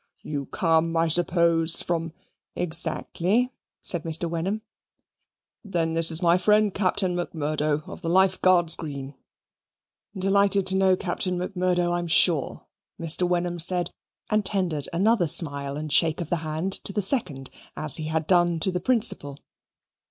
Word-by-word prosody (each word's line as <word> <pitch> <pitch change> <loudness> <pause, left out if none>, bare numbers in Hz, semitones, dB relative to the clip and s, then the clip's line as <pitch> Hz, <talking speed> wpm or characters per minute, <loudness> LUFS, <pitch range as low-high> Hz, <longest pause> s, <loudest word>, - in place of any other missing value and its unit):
"You 145 -2 -5
come, 165 -1 0
I 165 0 +2
suppose, 170 -1 +2
from 165 -1 -3 0.2
" - - -60
"Exactly," 180 +7 0 0.3
said 175 - 0
Mr. 165 +1 0
Wenham. 180 +6 -3 1.0
"Then 170 -6 -2
this 165 0 +1
is 165 +2 -1
my 175 +1 +3
friend 210 +1 +2
Captain 190 -1 -1
Macmurdo, 155 -3 -2
of - - -10
the 165 - -4
Life 190 +1 +2
Guards 175 -3 +4
Green." 140 -3 -7 1.0
"Delighted 195 0 +2
to 190 0 +2
know 190 -1 +3
Captain 180 0 -3
Macmurdo, 180 -1 -1
I'm 175 0 -2
sure," 160 -2 +1 0.3
Mr. 165 +2 +2
Wenham 175 0 -2
said 175 +1 +4 0.4
and 215 0 +1
tendered 180 -8 -2
another 195 +1 +1
smile 145 -3 0
and 150 -1 -4
shake 160 +1 +3
of 170 -3 -6
the 175 - +1
hand 160 +4 -4
to - - +1
the 205 0 -2
second, 150 - +1 0.3
as 155 -2 +1
he 155 - -5
had 160 0 -2
done 175 -1 +2
to 190 - 0
the 180 - -2
principal. 190 - +1
175 Hz, 150 wpm, -24 LUFS, 160-185 Hz, 1.0 s, Guards